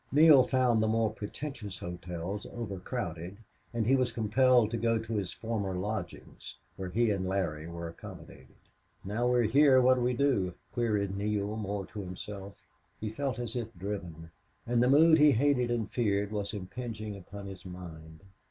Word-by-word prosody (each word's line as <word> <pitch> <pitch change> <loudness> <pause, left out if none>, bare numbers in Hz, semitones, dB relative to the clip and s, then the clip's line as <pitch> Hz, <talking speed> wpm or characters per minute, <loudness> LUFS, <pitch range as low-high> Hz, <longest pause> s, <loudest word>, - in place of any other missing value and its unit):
Neale 150 -1 +8
found 125 -3 +2
the 110 - +2
more 110 0 +2
pretentious 105 -2 -6
hotels 90 +3 -5
overcrowded, 95 -5 -5 0.3
and 115 -2 -1
he 130 +4 +4
was 130 -2 +1
compelled 115 +1 +3
to 120 - -1
go 115 0 +2
to 110 +1 -5
his 100 -4 -1
former 105 -5 -3
lodgings, 95 -1 -5 0.2
where 95 -1 -5
he 115 +4 +2
and 95 -2 -1
Larry 85 -5 -2
were 85 0 -6
accommodated. 85 - -11 0.5
"Now, 110 +5 0
we're 125 -1 +3
here, 130 +4 +6
what 130 0 +5
'll - - 0
we 125 0 +1
do?" 120 -10 +1 0.2
queried 105 -5 0
Neale, 105 +1 -1
more 100 -2 -3
to 105 - -9
himself. 100 +1 -7 0.4
He 105 -1 -3
felt 135 +3 -2
as 120 -1 -4
if 115 -2 -3
driven. 85 -4 -6 0.3
And 120 0 +2
the 125 - +4
mood 160 +3 +7
he 150 -1 +7
hated 125 0 +2
and 115 -3 0
feared 105 -4 0
was 105 -2 -2
impinging 105 +1 -6
upon 100 +1 -9
his 95 -2 -9
mind. 80 -3 -10
105 Hz, 170 wpm, -30 LUFS, 95-120 Hz, 0.5 s, Neale